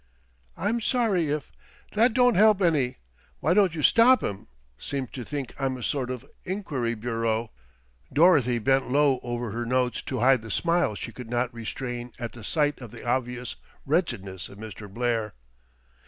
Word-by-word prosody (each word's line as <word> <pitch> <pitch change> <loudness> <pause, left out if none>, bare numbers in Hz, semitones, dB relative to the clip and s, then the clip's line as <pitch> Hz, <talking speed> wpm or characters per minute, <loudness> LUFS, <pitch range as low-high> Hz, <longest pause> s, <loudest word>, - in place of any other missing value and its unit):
"I'm 220 +5 0
sorry 215 - +1
if 150 -1 -3 0.2
" - - -28
"That 225 +2 +3
don't 245 -1 +5
help 215 +1 +5
any. 150 -9 +2 0.4
Why 165 - +2
don't 190 -4 +3
you 155 - -3
stop 250 +3 +6
'em? 100 - -4 0.3
Seem 135 - -3
to 125 - -7
think 140 -1 -5
I'm 135 -1 -1
a 125 - -8
sort 130 -1 -1
of 130 -2 -5 0.2
enquiry 145 - -2
bureau." 115 0 -1 0.6
Dorothy 145 -7 +5
bent 135 +3 +2
low 140 -1 +3
over 120 -2 -4
her 120 +3 -3
notes 125 +1 0
to - - -4
hide 130 -1 +5
the 115 - -9
smile 170 -2 +1
she 115 - -6
could 120 -1 -9
not 120 0 -1
restrain 120 +1 -5
at 120 -3 -5
the 120 - -11
sight 145 +3 0
of 120 - -8
the - - -11
obvious 125 -1 -2 0.3
wretchedness 120 - -1
of 100 - -13
Mr. 105 -2 -9
Blair. 115 -2 -1
130 Hz, 170 wpm, -26 LUFS, 120-160 Hz, 0.6 s, stop